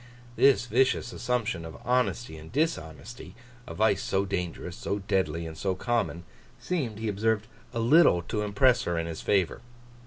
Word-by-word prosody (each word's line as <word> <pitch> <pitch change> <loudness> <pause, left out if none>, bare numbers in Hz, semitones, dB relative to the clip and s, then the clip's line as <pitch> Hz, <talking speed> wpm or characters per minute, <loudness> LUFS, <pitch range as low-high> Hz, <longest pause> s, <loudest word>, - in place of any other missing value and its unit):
This 135 -2 +4
vicious 125 0 +1
assumption 115 -8 -1
of 80 -1 -9
honesty 125 -6 0
in 80 0 -11
dishonesty—a 120 - -5
vice 110 -2 +2
so 95 +1 0
dangerous, 90 -1 -4
so 100 - -3
deadly, 90 -5 -1
and 80 -1 -7
so 95 +3 -1
common—seemed, 110 - -3
he 110 +1 -3
observed, 110 +1 0 0.3
a 120 - -6
little 115 - +5
to 105 +4 -3
impress 105 +5 +3
her 85 -1 -1
in 80 - -1
his 80 -1 -6
favour. 95 -5 +1
105 Hz, 150 wpm, -28 LUFS, 85-120 Hz, 0.3 s, little